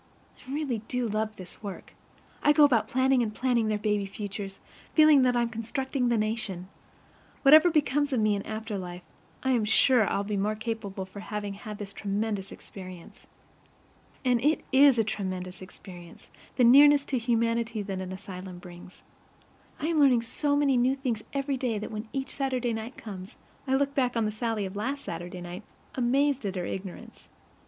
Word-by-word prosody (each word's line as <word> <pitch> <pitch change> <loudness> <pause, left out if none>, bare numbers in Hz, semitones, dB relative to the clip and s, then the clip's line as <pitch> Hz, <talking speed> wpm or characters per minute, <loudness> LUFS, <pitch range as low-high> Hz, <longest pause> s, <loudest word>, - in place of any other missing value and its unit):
I 255 - -12
really 280 -5 -1
do 250 -1 -1
love 215 0 -2
this 185 -1 -11
work. 200 -3 -8 0.5
I 295 - +5
go 300 - +6
about 235 -7 +4
planning 260 +1 +3
and 215 -2 -2
planning 240 -3 +1
their 215 -1 +1
baby 210 -1 0
futures, 195 -1 -6 0.4
feeling 310 -3 +7
that 250 -1 +3
I'm 240 -1 +2
constructing 245 +3 -2
the 235 - +2
nation. 210 -4 -3 0.7
Whatever 310 +5 +8
becomes 290 -2 +1
of 255 - +1
me 215 -1 +3
in 200 - -1
after 215 -1 -5
life, 180 -1 -7 0.4
I 265 - +2
am 240 -4 +2
sure 220 +1 +4
I'll 200 - 0
be 205 0 -2
the - - 0
more 210 +2 0
capable 215 -4 -4
for 190 +2 -11
having 205 -1 -4
had 210 +1 -8
this 200 -1 -7
tremendous 205 -1 -2
experience. 185 -3 -11 1.0
And 245 -2 +2
it 300 +2 +2
IS 270 -1 +6
a 225 - +4
tremendous 185 -3 -4
experience, 180 -2 -12 0.2
the 250 - +3
nearness 285 +4 +7
to 260 - -1
humanity 230 -1 0
that 190 -1 -4
an 185 0 -6
asylum 185 -1 -8
brings. 175 0 -12 0.8
I - - -3
am 325 -1 +1
learning 255 -5 +5
so 285 +5 -1
many 280 -3 +3
new 255 +2 +3
things 250 -6 -2
every 275 -1 -1
day 245 -4 -1
that 210 - -5
when 215 +1 -6
each 270 0 -3
Saturday 255 -4 -1
night 225 +3 -6
comes 195 0 -9 0.3
I 265 - +2
look 280 +1 +1
back 250 -3 +1
on 225 - +2
the 215 - -1
Sallie 220 -1 -2
of 190 +1 -7
last 270 +7 -3
Saturday 175 +2 -6
night, 175 +2 -7 0.3
amazed 270 +2 +1
at 195 - -4
her 180 -1 -2
ignorance. 190 0 -8
225 Hz, 185 wpm, -28 LUFS, 200-260 Hz, 1.0 s, Whatever